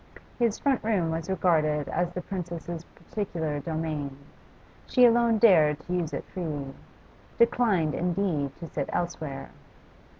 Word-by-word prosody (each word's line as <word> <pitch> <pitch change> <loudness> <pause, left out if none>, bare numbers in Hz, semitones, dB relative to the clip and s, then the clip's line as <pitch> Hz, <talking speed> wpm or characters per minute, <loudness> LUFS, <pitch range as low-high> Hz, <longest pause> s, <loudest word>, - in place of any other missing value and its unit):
His 230 -3 +2
front 275 -3 +1
room 195 -7 +1
was 165 +2 -3
regarded 155 -6 +2
as 175 +1 -1
the 180 0 -5
Princess's 170 -2 -5 0.3
peculiar 165 -8 -2
domain; 155 -3 -3 0.7
she 250 -2 +6
alone 235 -1 +4
dared 160 -10 +5
to 180 - -5
use 170 -3 -1
it - - -4
freely 150 -6 -4 0.6
declined, 220 -9 +3
indeed, 170 -6 -1
to 170 - -8
sit 145 -3 -3
elsewhere. 155 -6 -3
170 Hz, 130 wpm, -27 LUFS, 155-195 Hz, 0.7 s, she